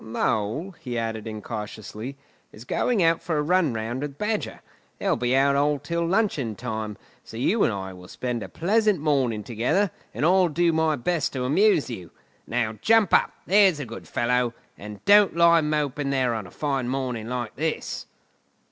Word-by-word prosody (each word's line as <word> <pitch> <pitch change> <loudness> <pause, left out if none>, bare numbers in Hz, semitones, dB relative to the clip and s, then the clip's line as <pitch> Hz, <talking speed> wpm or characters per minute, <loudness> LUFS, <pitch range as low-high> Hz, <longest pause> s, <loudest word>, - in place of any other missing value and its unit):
"Mole," 110 - -1
he 125 -2 -5
added 115 -1 -3
incautiously, 110 +3 -6 0.3
"is 110 - -13
going 220 - +1
out 165 0 +3
for 160 -3 -2
a - - +2
run 175 -2 +2
round 115 +3 -3
with 145 -1 -5
Badger. 210 +3 -2 0.4
They'll - - +1
be 125 +1 0
out 140 +1 +2
till 170 +2 -1
luncheon 170 - 0
time, 110 -2 -4 0.3
so 115 - -10
you 200 - +2
and - - +3
I 95 -2 -5
will 90 0 -12
spend 125 +1 -4
a - - -7
pleasant 210 +2 +2
morning 135 -8 +1
together, 125 - 0 0.2
and 145 - -1
I'll 185 +1 +5
do 170 +2 +2
my 160 -1 +2
best 155 +4 -1
to 130 -2 -2
amuse 155 +5 +3
you. 90 -7 -7 0.4
Now 110 -2 -1
jump 225 -4 +4
up, - - +4
there's 195 -4 +5
a 145 - -4
good 115 0 -9
fellow, 125 0 0 0.2
and 105 0 -10
don't 205 -2 +6
lie 170 -1 +6
moping 150 -2 -1
there 130 -3 +1
on 110 -4 -4
a - - -14
fine 135 -4 -2
morning 125 -4 -3
like 125 -1 -4
this!" 160 +3 -3
135 Hz, 175 wpm, -25 LUFS, 115-170 Hz, 0.4 s, don't